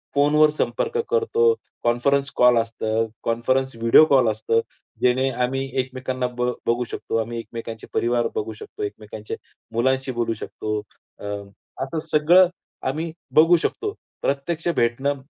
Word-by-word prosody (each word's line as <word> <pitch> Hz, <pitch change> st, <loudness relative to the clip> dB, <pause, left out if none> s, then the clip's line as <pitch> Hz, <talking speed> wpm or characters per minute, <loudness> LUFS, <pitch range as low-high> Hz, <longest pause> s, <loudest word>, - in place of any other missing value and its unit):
फोनवर 150 Hz, +2 st, +5 dB
संपर्क 460 Hz, -, -1 dB
करतो, 460 Hz, 0 st, +3 dB, 0.3 s
कॉन्फरन्स 135 Hz, +4 st, +2 dB
कॉल 125 Hz, -1 st, +6 dB
असतं, 115 Hz, 0 st, 0 dB, 0.2 s
कॉन्फरन्स 130 Hz, +3 st, 0 dB
व्हिडिओ 115 Hz, +6 st, +6 dB
कॉल 135 Hz, -6 st, +4 dB
असतो, 110 Hz, +1 st, +1 dB, 0.4 s
जेणे 130 Hz, +2 st, +3 dB
आम्ही 135 Hz, +2 st, 0 dB, 0.2 s
एकमेकांना 130 Hz, 0 st, -3 dB
ब 125 Hz, 0 st, -1 dB, 0.2 s
बघू 120 Hz, +1 st, +2 dB
शकतो. 115 Hz, -, -3 dB
आम्ही 115 Hz, +1 st, -2 dB
एकमेकांचे 115 Hz, 0 st, -7 dB
परिवार 120 Hz, 0 st, +1 dB
बघू 110 Hz, +1 st, -2 dB
शकतो, 105 Hz, -, -8 dB
एकमेकांचे 105 Hz, +1 st, -6 dB, 0.4 s
मुलांशी 130 Hz, +3 st, +1 dB
बोलू 120 Hz, -2 st, -1 dB
शकतो. 105 Hz, 0 st, -4 dB, 0.4 s
अ, -, -, -12 dB, 0.6 s
असं 150 Hz, +4 st, -3 dB
सगळं 175 Hz, +5 st, +6 dB, 0.4 s
आम्ही, 160 Hz, +4 st, -3 dB, 0.2 s
बघू 165 Hz, +3 st, +7 dB
शकतो. 415 Hz, -, -2 dB, 0.3 s
प्रत्यक्ष 155 Hz, +5 st, -1 dB
भेटणं 135 Hz, +4 st, +1 dB
125 Hz, 130 wpm, -23 LUFS, 115-145 Hz, 0.6 s, बघू